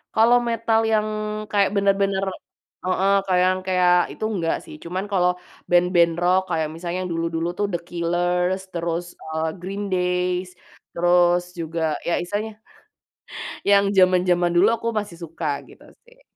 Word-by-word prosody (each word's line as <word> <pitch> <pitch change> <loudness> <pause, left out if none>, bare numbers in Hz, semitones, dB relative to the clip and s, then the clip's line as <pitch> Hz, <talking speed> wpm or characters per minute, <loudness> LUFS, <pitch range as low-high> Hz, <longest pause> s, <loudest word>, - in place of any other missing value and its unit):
Kalau 230 +2 +5
metal 230 -1 +1
yang 215 0 +2 0.4
kayak 200 -2 +3
bener-bener, 195 -1 +2 0.6
heeh, 190 +2 +2
kayak 180 -2 +2
yang 185 0 0
kayak 180 -1 +4 0.2
itu - - -4
nggak 165 -3 0
sih. 320 - -10
Cuman 185 +4 -4
kalau 180 -2 +3 0.4
band-band 175 -1 +4
rock, 185 +1 +4
kayak 160 -2 0
misalnya 175 +2 -4
yang 180 -1 -4
dulu-dulu 165 0 -2
tuh 205 - +1
The 175 - 0
Killers, 175 +2 0
terus, 170 0 -2 0.2
eee, 160 0 -2
Green 195 +3 -4
Days, 180 0 0 0.4
terus 175 0 +3 0.2
juga 165 0 -4 0.3
ya 170 - +1
istilahnya 205 +5 -3 1.2
yang 200 0 +6
zaman-zaman 180 -1 +4
dulu 180 +5 +5
aku 230 0 -5
masih 200 -5 -8
suka, 165 0 -5 0.2
gitu - - -17 0.2
sih. - - -23
180 Hz, 145 wpm, -22 LUFS, 175-195 Hz, 1.2 s, yang